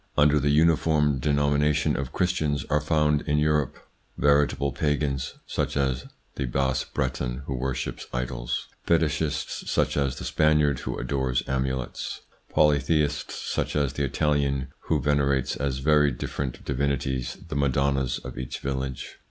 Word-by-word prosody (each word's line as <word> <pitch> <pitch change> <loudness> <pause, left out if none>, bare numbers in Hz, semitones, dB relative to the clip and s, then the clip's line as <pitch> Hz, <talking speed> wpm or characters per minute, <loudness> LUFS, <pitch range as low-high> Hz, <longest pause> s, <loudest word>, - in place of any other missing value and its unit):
Under 75 0 +5
the 75 +1 +1
uniform 75 -2 +3
denomina 75 +1 +2
tion 75 - +1
of 70 -2 -3
Christians 80 -6 0
are 75 0 +3
found 75 -1 +2
in 75 0 +2
Europe 75 -2 +1 0.4
veritable 70 0 +3
pagans, 70 -1 -1
such - - -2
as 65 -3 0 0.3
the 70 - -1
Bas 65 +1 0
Breton 65 -2 -3
who 70 - -3
worships 65 0 -3
idols; - - -3 0.2
fetichists, 80 -2 0
such - - +1
as 70 -3 0
the - - -7
Spaniard 75 -3 +3
who - - -4
adores 65 -3 0
amulets; 65 -1 -2 0.3
polytheists, 75 -1 +2 0.2
such - - -1
as 70 -4 +1
the 70 - -2
Italian 70 -1 0 0.2
who 80 - +1
venerates 70 -1 +1
as 70 -1 -1
very 75 +1 +4
different 65 +1 -4
divinities 70 -2 -1
the 75 - -4
madonnas 70 -2 +1
of - - -7
each 65 - -4
village. 65 -1 -4
70 Hz, 140 wpm, -26 LUFS, 65-75 Hz, 0.4 s, Under